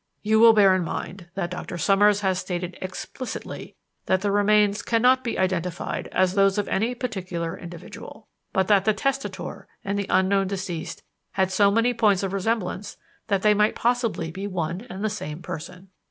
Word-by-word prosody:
You 220 +1 +3
will 230 0 +8
bear 200 -3 +6
in 185 -1 +1
mind 175 +2 -6
that 180 -3 -2
Doctor 180 -1 -5
Summers 205 +3 +4
has 190 -2 +1
stated 180 -1 -4
explicitly 185 +7 -6 0.3
that 185 0 +2
the 205 0 0
remains 205 0 +3
cannot 250 +3 +3
be 235 - -2
identified 180 -2 -2
as 185 0 +1
those 195 0 +3
of 205 - 0
any 225 +5 0
particular 185 -8 -4
individual, 175 -2 -10 0.2
but 190 -1 +1
that 200 -2 +4
the 215 -1 +3
testator 275 +4 -3 0.2
and 200 +1 -1
the 200 - -3
unknown 195 +1 +3
deceased 185 -4 -5 0.3
had 190 0 +1
so 200 +1 +4
many 230 +4 +2
points 210 -5 +2
of 195 0 -2
resemblance 200 -1 -2 0.3
that 200 -3 0
they 210 0 +6
might 210 +1 +2
possibly 230 -9 0
be 195 +4 -5
one 180 +3 -3
and 190 +1 -6
the - - +3
same 175 -6 -5
person. 180 +4 -8
195 Hz, 175 wpm, -24 LUFS, 185-210 Hz, 0.3 s, will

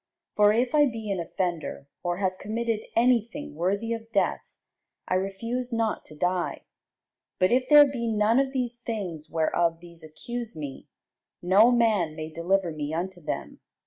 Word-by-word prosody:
For 210 0 +6
if 240 +5 +1
I 295 -1 +5
be 225 -4 -4
an 190 - -1
offender, 170 -4 -3
or 175 -1 -2
have 185 -1 -1
committed 225 +1 -2
any 240 0 +5
thing 285 - -9
worthy 200 +8 -1
of 225 0 -7
death, 200 - +1 0.7
I - - -1
refuse 230 +7 -2
not 225 -1 -1
to 155 - -13
die: 180 +2 -1 0.7
but 185 0 +3
if 255 +1 +2
there 295 -1 +9
be 250 -4 -3
none 220 +2 +3
of 270 -1 +1
these 245 -3 -2
things 185 -10 -5
whereof 165 +1 +1
these 170 -1 -14
accuse 230 +8 -7
me, 145 -3 -7 0.6
no 195 +6 +6
man 215 -10 +2
may 155 0 -6
deliver 175 +2 0
me 150 -1 -4
unto 180 +1 -4
them. 150 -1 -5
200 Hz, 165 wpm, -26 LUFS, 170-235 Hz, 0.7 s, there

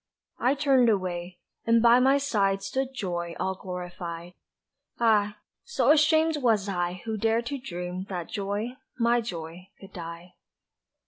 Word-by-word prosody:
I 255 +3 +2
turned 270 -4 +4
away, 180 -3 -2 0.3
and 230 0 +4
by 235 +1 +6
my 265 +2 +4
side 200 -8 +1
stood 260 +7 -1
Joy 175 -8 -4
All 190 - 0
glorified 180 -2 -7 0.7
ah, 210 -3 +3 0.3
so 475 - +2
ashamed 315 +1 +4
was 225 -7 +2
I 175 -1 -2
Who 220 -1 -2
dared 225 +2 +1
to 280 +2 -3
dream 180 -4 -5
that 175 -4 -4
Joy, 205 +5 -3 0.2
my 235 0 +3
Joy, 175 -3 -7
could 195 0 -14
die! 170 +1 -8
200 Hz, 140 wpm, -27 LUFS, 180-240 Hz, 0.7 s, by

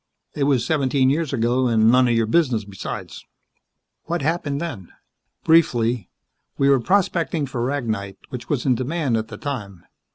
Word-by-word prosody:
"It 140 - 0
was 135 -5 +2
seventeen 135 -3 +2
years 155 0 -1
ago, 125 0 +1
and 110 -1 +4
none 125 0 +5
of 120 - +2
your 115 -1 +2
business 120 -4 +1
besides." 100 -2 -7 0.8
"What 170 -2 -2
happened 150 -2 -1
then?" 125 - -6 0.5
"Briefly, 120 - +2 0.5
we 140 - +3
were 135 -1 +5
prospecting 170 - +1
for 125 -3 -4
ragnite, 110 -8 -3
which 120 -2 -8
was 140 -5 -1
in 130 - +4
demand 130 +1 -1
at 110 0 -2
the 105 - -9
time. 105 - -6
130 Hz, 160 wpm, -22 LUFS, 115-145 Hz, 0.8 s, none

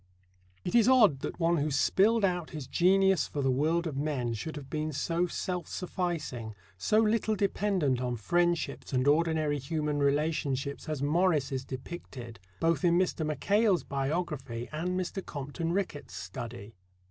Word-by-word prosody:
It 180 - -2
is 235 -2 +5
odd 215 - +6
that - - -5
one 170 0 +3
who 150 +1 0
spilled 200 +9 +3
out 180 -3 -1
his 150 -4 -6
genius 190 +5 +3
for 145 - -3
the 135 - +3
world 160 +6 +1
of 155 -4 -3
men 135 -5 -1
should 155 +9 -5
have 145 -3 -7
been 155 +2 -2
so 170 +5 0
self 180 0 -3
sufficing, 165 - -3 0.2
so 150 - +1
little 220 0 +2
dependent 190 -9 +1
on 125 -1 -1
friendships 170 - 0
and 130 +1 +2
ordinary 155 -1 +2
human 150 +1 -2
relationships 140 0 0
as 150 -3 -2
Morris 155 -2 +2
is 130 -1 -2
depicted 130 - -8 0.2
both 165 -3 +1
in 170 -1 +4
Mr. 180 -3 +1
Mackail's 190 - +2
biography 135 -4 -3
and 180 +4 -2
Mr. 185 +1 -3
Compton 145 +4 -4
Rickett's 175 -6 -3
study. 115 -4 -7
155 Hz, 155 wpm, -30 LUFS, 135-180 Hz, 0.2 s, odd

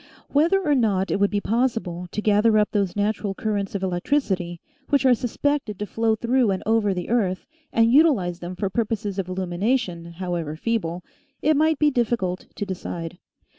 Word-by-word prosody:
Whether 330 +7 +3
or 295 - +4
not 205 -7 +1
it - - 0
would 200 0 +3
be 205 - 0
possible 220 -8 -1
to 210 - -3
gather 215 +1 +4
up 210 -1 +2
those 200 -4 0
natural 205 -1 -1
currents 205 -2 -2
of 195 - -2
electricity, 180 - -1 0.3
which 280 -1 +2
are 255 - +7
suspected 250 -2 -1
to 210 - -3
flow 225 +1 0
through 240 +1 +2
and 190 -1 -1
over 220 -2 +2
the 180 -2 -4
earth, 200 -6 0 0.3
and 230 +1 +3
utilize 235 - +4
them 175 +1 -6
for 195 - -1
purposes 210 -3 -2
of 185 -1 -3
illumination, 185 -1 -1
however 170 -3 -3
feeble, 180 -3 -2 0.4
it 310 +1 +4
might 315 +1 +3
be 300 0 +3
difficult 230 -8 -1
to 205 - -3
decide. 175 -2 -6
205 Hz, 175 wpm, -23 LUFS, 185-235 Hz, 0.4 s, are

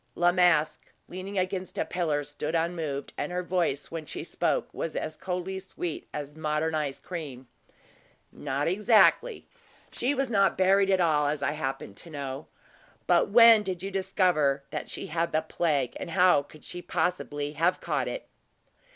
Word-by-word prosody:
La 175 0 +4
Masque, 175 -4 +2 0.2
leaning 190 +2 -6
against 185 0 -2
a - - 0
pillar, 155 -5 -1
stood 145 +3 -4
unmoved; 160 -4 -2
and - - -2
her 180 0 -2
voice, 175 -6 -1
when 165 -1 -4
she 150 - -6
spoke, - - -1
was 165 - -4
as 155 - -3
coldly 185 +1 -4
sweet 180 -3 -6
as 145 -1 -6
modern 155 +1 -1
ice 150 -3 -2
cream. 145 -8 -7 0.8
"Not 140 0 -2
exactly. 210 - +3 0.4
She 265 +4 -1
was 270 0 0
not 200 -3 +3
buried 195 +1 +4
at 190 -1 +3
all, 150 -4 +3
as 145 -1 -2
I - - +1
happen 135 -8 -4
to 170 - -11
know. 140 -2 -6 0.6
But - - +3
when 230 0 +8
did 185 -3 -4
you 195 - -4
discover 180 -8 +1
that - - -5
she - - -5
had 165 +1 -1
the 155 0 +1
plague, 150 -6 0
and - - -5
how 180 -3 +4
could 150 +1 -16
she 175 - -5
possibly 145 -6 -2
have 170 +4 +1
caught - - -1
it?" - - -5
170 Hz, 170 wpm, -28 LUFS, 150-185 Hz, 0.8 s, when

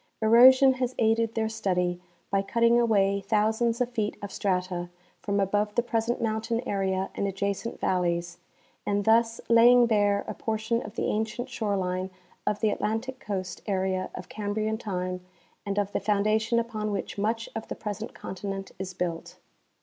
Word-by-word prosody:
Erosion 255 +4 +7
has 255 -1 -2
aided 225 0 +2
their 220 -1 +1
study 180 -5 -1 0.3
by 195 0 +2
cutting 235 +4 +3
away 200 -4 +3
thousands 220 +3 +1
of 250 -1 0
feet 215 -3 -2
of 200 - -5
strata 180 -3 -1 0.3
from 200 -1 -1
above 205 +2 0
the 240 - +2
present 235 0 -1
mountain 225 +1 -1
area 190 -1 -1
and 200 - -1
adja 200 +1 -1
cent 200 +4 -7
valleys, 175 -1 -1 0.4
and 205 0 0
thus 230 +1 +3
laying 240 +1 +7
bare 205 -3 +2
a - - -3
portion 220 +1 -1
of 210 - -9
the - - -1
ancient 220 +4 -2
shore 210 -5 -1
line 185 0 -2 0.4
of 210 - 0
the 215 -2 +3
Atlantic 230 +6 -2
coast 190 -5 -4
area 190 -1 -1
of 180 - -7
Cambrian 215 +1 -2
time 180 -4 -3 0.4
and 200 0 -2
of 205 -1 0
the - - -1
foundation 215 +3 +1
upon 225 -2 -2
which 200 0 -4
much 225 +2 -1
of 225 - -5
the - - -5
present 210 +1 -6
continent 195 +1 -6
is 185 -1 -5
built. 175 -2 -4
210 Hz, 165 wpm, -27 LUFS, 195-225 Hz, 0.4 s, Erosion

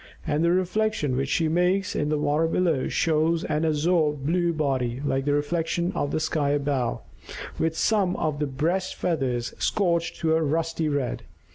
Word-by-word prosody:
And 150 +2 0
the 170 - +3
reflection 185 -5 0
which 135 +1 -1
she 165 +2 +1
makes 180 +4 +1
in 150 - 0
the 155 - +1
water 150 +2 +1
below 165 -5 +1
shows 160 +1 +1
an 150 +2 -1
azure 160 0 +2
blue 170 +5 0
body, 130 -6 -1
like 135 0 -1
a - - +3
reflection 165 +4 0
of 145 - -1
the - - -1
sky 155 -2 0
above, 140 -4 0 0.6
with 160 0 0
some 200 -5 +2
of 150 -2 -2
the 150 - 0
breast 165 +8 -1
feathers 130 -8 -1
scorched 170 -5 0
to 160 -1 +2
a 160 - +2
rusty 160 +1 0
red. 140 -4 -2
155 Hz, 170 wpm, -25 LUFS, 145-170 Hz, 0.6 s, the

